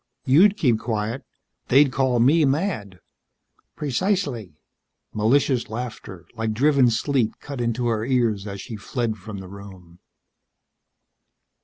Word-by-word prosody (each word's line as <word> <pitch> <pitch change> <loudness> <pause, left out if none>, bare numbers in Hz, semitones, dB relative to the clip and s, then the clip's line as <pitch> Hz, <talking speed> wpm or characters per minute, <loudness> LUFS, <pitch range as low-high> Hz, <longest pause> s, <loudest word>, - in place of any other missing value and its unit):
You'd 190 +10 +5
keep 120 - +2
quiet. 115 +1 -3 0.4
They'd 135 +1 +5
call 130 -1 +1
me 145 +7 +4
mad." 135 - -1 0.8
"Precisely." 140 - -2 0.6
Malicious 120 +2 +1
laughter, 110 -6 -7
like 115 -1 -2
driven 135 +1 +4
sleet, 120 0 0
cut 140 -4 -6
into 120 +1 -1
her 110 -2 0
ears 115 -5 0
as 100 -1 -6
she 115 0 -7
fled 115 +1 -3
from 105 +1 -9
the 95 -1 -8
room. 95 -3 -13
120 Hz, 120 wpm, -23 LUFS, 105-135 Hz, 0.8 s, You'd